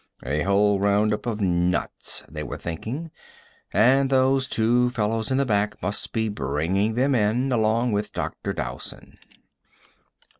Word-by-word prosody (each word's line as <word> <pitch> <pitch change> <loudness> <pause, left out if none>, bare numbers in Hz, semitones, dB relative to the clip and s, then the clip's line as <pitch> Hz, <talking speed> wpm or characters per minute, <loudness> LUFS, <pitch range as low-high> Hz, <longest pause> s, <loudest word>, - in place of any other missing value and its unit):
"A 75 +4 -1
whole 100 +1 +3
roundup 105 +2 +1
of 110 -2 -2
nuts," 90 -2 0
they 75 -1 -7
were 75 - -5
thinking. 120 - -5 0.6
"And 135 +3 +4
those 130 0 +3
two 120 +2 +2
fellows 110 -2 -1
in 130 - +1
the 140 - +2
back 105 -2 0
must 95 +3 -3
be 110 0 0
bringing 90 +6 -1
them 135 +3 +2
in 120 +3 +1
along 115 +1 +2
with 105 0 -1
Dr. - - -4
Dowson." 60 -1 -7
110 Hz, 140 wpm, -24 LUFS, 100-125 Hz, 0.6 s, And